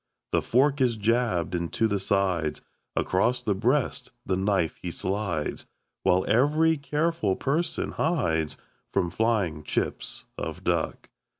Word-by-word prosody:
The - - +2
fork 135 +3 +2
is 125 -3 +3
jabbed 110 -5 +1
into 85 +6 0
the 100 -2 0
sides 95 -5 0 0.3
Across 120 +7 +1
the 105 - +1
breast 125 +9 0
the 95 - +1
knife 95 -3 +1
he 90 - -3
slides 95 -3 -2 0.3
While 90 +1 +3
every 150 +7 +4
careful 150 - 0
person 160 +5 -1
hides 80 - 0 0.3
From 85 - 0
flying 105 -9 0
chips 75 - 0
of - - -5
duck. - - -1
105 Hz, 125 wpm, -27 LUFS, 90-130 Hz, 0.3 s, every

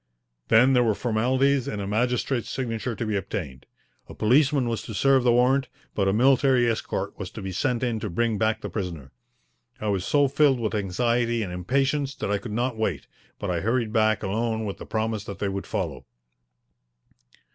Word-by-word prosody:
Then 120 +4 +5
there 125 - +5
were 110 -3 +2
formalities 130 +4 +1
and 105 -7 -3
a 100 - -3
magistrate's 120 +3 0
signature 120 -2 -3
to 115 - -3
be 110 -1 -1
obtained. 85 -9 -5 0.4
A - - -9
policeman 135 +3 +3
was 115 -3 -2
to 110 - -7
serve 135 +4 +4
the 125 - +4
warrant, 130 +3 +3 0.3
but 100 -2 0
a - - +3
military 130 +2 +4
escort 115 -1 -3
was - - -5
to - - -9
be 95 - -4
sent 115 +7 -1
in 120 -3 0
to 105 - -4
bring 110 +3 0
back 110 0 +1
the - - -5
prisoner. 85 - -5 0.7
I 105 - -2
was 95 -2 0
so 145 +5 +3
filled 135 -1 +3
with 110 -2 -2
anxiety 115 +3 0
and 90 -3 -5
impatience 135 - 0
that - - -3
I 105 - +1
could 115 - -7
not 120 +2 -1
wait, 100 -9 -2 0.3
but 100 -3 -3
I 85 - 0
hurried 115 +2 0
back 110 -2 +2
alone 110 +2 -1
with 100 - -5
the - - -9
promise 110 -1 -2
that 100 - -7
they 100 - -1
would 95 0 -4
follow. - - -3
115 Hz, 195 wpm, -25 LUFS, 100-125 Hz, 0.7 s, Then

